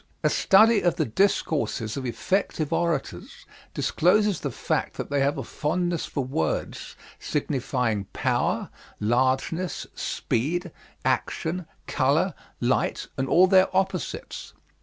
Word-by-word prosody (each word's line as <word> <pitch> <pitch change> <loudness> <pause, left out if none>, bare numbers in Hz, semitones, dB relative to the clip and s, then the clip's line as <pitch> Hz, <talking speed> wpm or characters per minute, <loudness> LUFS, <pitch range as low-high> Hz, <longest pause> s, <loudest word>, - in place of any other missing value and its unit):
"A - - +3
study 215 +2 +5
of 175 -2 +2
the 155 - 0
discourses 135 - 0
of 130 -2 -3
effective 160 +3 -1
orators 170 -2 -2 0.3
discloses 205 +2 +2
the 140 - -3
fact 115 - -2
that - - -6
they 145 - +2
have 140 +2 +1
a 135 - -3
fondness 170 +5 -1
for 150 -3 -2
words 80 - -3 0.2
signifying 125 -7 -1
power, - - -1 0.3
largeness, 130 - 0
speed, 170 - -2 0.3
action, 170 +1 -1 0.2
color, 155 +8 +1 0.3
light, 125 +1 0
and 135 0 -2
all 180 +2 +6
their 190 0 +5
opposites. 190 0 -3
155 Hz, 115 wpm, -25 LUFS, 130-180 Hz, 0.3 s, all